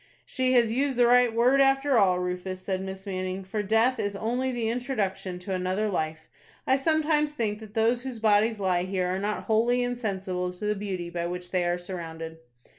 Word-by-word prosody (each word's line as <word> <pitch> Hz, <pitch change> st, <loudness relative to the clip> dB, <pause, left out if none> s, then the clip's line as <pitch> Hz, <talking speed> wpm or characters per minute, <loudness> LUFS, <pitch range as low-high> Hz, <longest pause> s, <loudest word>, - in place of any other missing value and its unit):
"She 255 Hz, -1 st, 0 dB
has 235 Hz, -3 st, +4 dB
used 265 Hz, +2 st, 0 dB
the 245 Hz, -, +5 dB
right 245 Hz, 0 st, +5 dB
word, 245 Hz, +4 st, +4 dB
after 270 Hz, 0 st, +3 dB
all, 190 Hz, -5 st, +4 dB
Rufus," 180 Hz, +1 st, -3 dB
said 190 Hz, -1 st, -2 dB
Miss 190 Hz, +1 st, -7 dB
Manning; 185 Hz, 0 st, -3 dB
"for 195 Hz, +3 st, -3 dB
death 225 Hz, +5 st, +2 dB
is 205 Hz, -2 st, -2 dB
only 245 Hz, +5 st, -1 dB
the 240 Hz, -3 st, -2 dB
introduction 215 Hz, -7 st, -2 dB
to 180 Hz, +2 st, -5 dB
another 185 Hz, +3 st, -1 dB
life. 160 Hz, -3 st, -3 dB, 0.4 s
I 265 Hz, -, +4 dB
sometimes 300 Hz, +1 st, +1 dB
think 215 Hz, -7 st, -2 dB
that 215 Hz, -2 st, -12 dB
those 230 Hz, +2 st, +2 dB
whose 260 Hz, -2 st, -6 dB
bodies 220 Hz, 0 st, +3 dB
lie 185 Hz, -3 st, +1 dB
here 185 Hz, 0 st, -1 dB
are -, -, -2 dB
not 205 Hz, +1 st, -2 dB
wholly 235 Hz, +3 st, +2 dB
insensible 195 Hz, -7 st, -2 dB
to 180 Hz, +4 st, -7 dB
the 210 Hz, -, +2 dB
beauty 190 Hz, -4 st, -4 dB
by 170 Hz, 0 st, -2 dB
which 180 Hz, 0 st, -6 dB
they 180 Hz, -2 st, +1 dB
are 175 Hz, 0 st, +1 dB
surrounded." 165 Hz, -3 st, -7 dB
210 Hz, 195 wpm, -27 LUFS, 185-245 Hz, 0.4 s, the